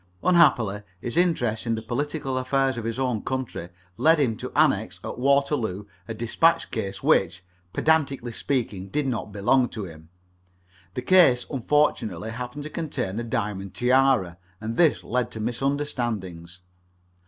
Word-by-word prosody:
Unhappily 120 Hz, -, +4 dB, 0.2 s
his 120 Hz, +5 st, -4 dB
interest 125 Hz, -11 st, +1 dB
in 115 Hz, -, +1 dB
the 110 Hz, -, -4 dB
political 135 Hz, +3 st, -3 dB
affairs 130 Hz, +1 st, +1 dB
of 115 Hz, -2 st, -5 dB
his 115 Hz, +1 st, -3 dB
own 125 Hz, -5 st, -1 dB
country 130 Hz, -9 st, -4 dB, 0.3 s
led 160 Hz, 0 st, +4 dB
him 125 Hz, -6 st, +1 dB
to -, -, -6 dB
annex -, -, +2 dB
at -, -, -6 dB
Waterloo 135 Hz, -7 st, +1 dB, 0.2 s
a 115 Hz, -, -5 dB
despatch 120 Hz, +9 st, +2 dB
case 100 Hz, -4 st, -4 dB
which, 85 Hz, -, +2 dB, 0.3 s
pedantically 140 Hz, -5 st, +1 dB
speaking, 110 Hz, -7 st, -2 dB
did 150 Hz, +7 st, -1 dB
not 115 Hz, -5 st, -3 dB
belong 125 Hz, +6 st, +2 dB
to 110 Hz, -, -6 dB
him. 80 Hz, -2 st, -12 dB, 0.9 s
The 125 Hz, -, -3 dB
case 140 Hz, -8 st, +5 dB
unfortunately 115 Hz, -, 0 dB
happened 125 Hz, +5 st, -6 dB
to 155 Hz, -, -6 dB
contain 140 Hz, -, -3 dB
a -, -, -3 dB
diamond 100 Hz, -4 st, -3 dB
tiara, 125 Hz, -9 st, +2 dB, 0.2 s
and 110 Hz, +1 st, -4 dB
this 165 Hz, 0 st, +3 dB
led 125 Hz, 0 st, -1 dB
to 110 Hz, -, -6 dB
misunderstandings. 115 Hz, -, -3 dB
120 Hz, 145 wpm, -25 LUFS, 105-140 Hz, 0.9 s, case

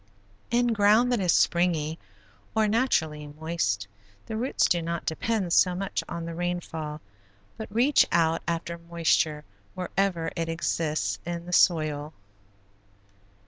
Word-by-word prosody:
In 240 Hz, 0 st, +2 dB
ground 215 Hz, +4 st, +4 dB
that 245 Hz, -, +2 dB
is 180 Hz, -3 st, +2 dB
springy, 165 Hz, -2 st, +2 dB, 0.6 s
or 220 Hz, -1 st, +3 dB
naturally 160 Hz, -, 0 dB
moist, 145 Hz, -10 st, -2 dB, 0.4 s
the 220 Hz, -, -5 dB
roots 245 Hz, +4 st, +1 dB
do 175 Hz, -, +1 dB
not 170 Hz, 0 st, -4 dB
depend 185 Hz, +2 st, -1 dB
so 180 Hz, -1 st, +4 dB
much 195 Hz, +1 st, -2 dB
on 170 Hz, -1 st, -4 dB
the 165 Hz, -, -5 dB
rainfall 165 Hz, -3 st, -4 dB, 0.5 s
but 220 Hz, -2 st, -8 dB
reach 250 Hz, +7 st, +4 dB
out 165 Hz, -1 st, +2 dB
after 170 Hz, 0 st, -3 dB
moisture 165 Hz, -3 st, 0 dB, 0.3 s
wherever 180 Hz, -2 st, -1 dB
it 165 Hz, -1 st, -2 dB
exists 155 Hz, -10 st, -1 dB
in 170 Hz, 0 st, -5 dB
the 180 Hz, -, -6 dB
soil. 155 Hz, -4 st, +2 dB
170 Hz, 130 wpm, -27 LUFS, 160-195 Hz, 0.6 s, ground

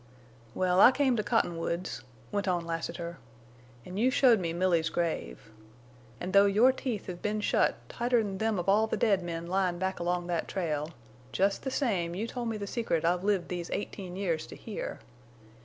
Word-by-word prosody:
"Well, 185 Hz, 0 st, +2 dB
I 245 Hz, -, +9 dB
came 265 Hz, -2 st, +2 dB
to -, -, +2 dB
Cottonwoods," 175 Hz, -5 st, -1 dB, 0.3 s
went 205 Hz, -1 st, -1 dB
on 175 Hz, -2 st, 0 dB
Lassiter, 170 Hz, +1 st, -4 dB, 0.7 s
"an' 185 Hz, -, -7 dB
you 240 Hz, +5 st, +3 dB
showed 250 Hz, -4 st, +5 dB
me 170 Hz, -3 st, -2 dB
Milly's 170 Hz, -2 st, +1 dB
grave. 110 Hz, -, -3 dB, 0.7 s
An' 180 Hz, -, -4 dB
though 200 Hz, +1 st, +6 dB
your 220 Hz, +6 st, +5 dB
teeth 250 Hz, -5 st, -4 dB
have 175 Hz, -2 st, -7 dB
been 210 Hz, +1 st, -1 dB
shut 210 Hz, -, +2 dB
tighter'n 230 Hz, -5 st, 0 dB
them 220 Hz, -1 st, +1 dB
of 175 Hz, -, -3 dB
all 210 Hz, +3 st, +4 dB
the -, -, -1 dB
dead 200 Hz, -4 st, +3 dB
men 170 Hz, -1 st, -4 dB
lyin' 180 Hz, 0 st, 0 dB
back 190 Hz, +1 st, -2 dB
along 175 Hz, 0 st, -1 dB
that 175 Hz, -2 st, -2 dB
trail, 155 Hz, -5 st, -2 dB, 0.4 s
jest 195 Hz, +1 st, +1 dB
the 265 Hz, -, -3 dB
same 190 Hz, -, 0 dB
you 210 Hz, +5 st, -2 dB
told 235 Hz, 0 st, -4 dB
me 220 Hz, -, -2 dB
the 205 Hz, -, -4 dB
secret 200 Hz, -7 st, -1 dB
I've 175 Hz, +2 st, +1 dB
lived 200 Hz, -3 st, +1 dB
these 175 Hz, -1 st, -4 dB
eighteen 190 Hz, -3 st, -5 dB
years 170 Hz, -5 st, -1 dB
to -, -, -10 dB
hear! 215 Hz, -, -6 dB
190 Hz, 185 wpm, -30 LUFS, 175-215 Hz, 0.7 s, I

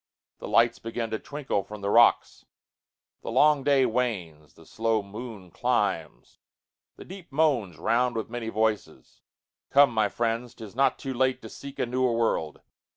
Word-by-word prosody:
The -, -, -7 dB
lights 115 Hz, 0 st, +3 dB
begin 115 Hz, 0 st, -4 dB
to 110 Hz, -, -2 dB
twinkle 145 Hz, -8 st, -3 dB
from 105 Hz, +1 st, -10 dB
the 100 Hz, 0 st, -1 dB
rocks:The 120 Hz, +2 st, 0 dB
long 140 Hz, +4 st, +4 dB
day 140 Hz, -2 st, +4 dB
wanes: 95 Hz, -12 st, -3 dB
the 80 Hz, -, -17 dB
slow 110 Hz, +1 st, -1 dB
moon 105 Hz, -2 st, -9 dB
climbs: -, -, -2 dB, 0.6 s
the -, -, -12 dB
deepMoans 150 Hz, -, -1 dB
round 120 Hz, +8 st, +1 dB
with 110 Hz, -, -3 dB
many 115 Hz, -1 st, -5 dB
voices. 110 Hz, -1 st, -2 dB, 0.5 s
Come, 140 Hz, -2 st, +5 dB
my 110 Hz, -2 st, +2 dB
friends,'T 115 Hz, +1 st, -3 dB
is 110 Hz, 0 st, -11 dB
not 135 Hz, 0 st, +2 dB
too 135 Hz, -, -5 dB
late 130 Hz, +1 st, +1 dB
to 110 Hz, -, -8 dB
seek 140 Hz, +4 st, -10 dB
a -, -, 0 dB
newer 125 Hz, 0 st, 0 dB
world. 110 Hz, -9 st, -1 dB
115 Hz, 155 wpm, -26 LUFS, 105-130 Hz, 0.6 s, Come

